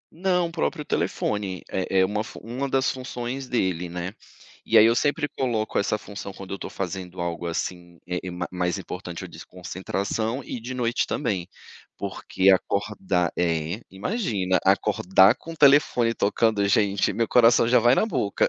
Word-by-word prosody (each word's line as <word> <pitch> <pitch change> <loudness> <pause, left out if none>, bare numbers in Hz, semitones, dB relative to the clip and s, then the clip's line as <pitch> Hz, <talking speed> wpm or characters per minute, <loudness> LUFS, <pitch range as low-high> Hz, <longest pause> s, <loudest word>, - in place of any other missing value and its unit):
Não, 180 0 +1
o - - -9
próprio 165 -2 -2
telefone. 100 -4 -2
É 95 0 0
é 95 - +5
uma 105 +2 -2
fu - - -10
uma 125 +5 -4
das 130 0 +2
funções 130 0 -5
dele, 90 -7 -1
né. 90 +2 -5 0.5
E - - +3
aí, 110 - +8
eu 115 - +4
sempre 145 +2 +1
coloco 115 -6 -1
essa 100 - +1
função 100 -1 -8
quando 95 0 -9
eu - - -7
tô - - -6
fazendo 95 -1 -5
algo 85 0 -3
assim, 85 0 -4
eh, 90 0 -1
eh, 90 - -4
ma 90 0 -4
mais 90 +1 -1
importante 90 -2 -7
a - - -8
desconcentração 100 +7 -4
e 125 - -6
de 125 +3 -6
noite 120 -1 0
também, 100 -11 -2 0.5
porque 95 +1 -1
acordar 95 -2 0
É. 85 +3 0
Imagina, 100 - -1
acordar 95 +2 +4
com 165 - -9
o - - -10
telefone 140 -5 +4
tocando, 105 0 +1
gente, 100 0 +2
meu 115 -2 0
coração 115 -1 +5
já 125 +1 +5
vai 120 +2 +5
na 215 - +2
boca 105 - 0
100 Hz, 170 wpm, -25 LUFS, 90-125 Hz, 0.5 s, aí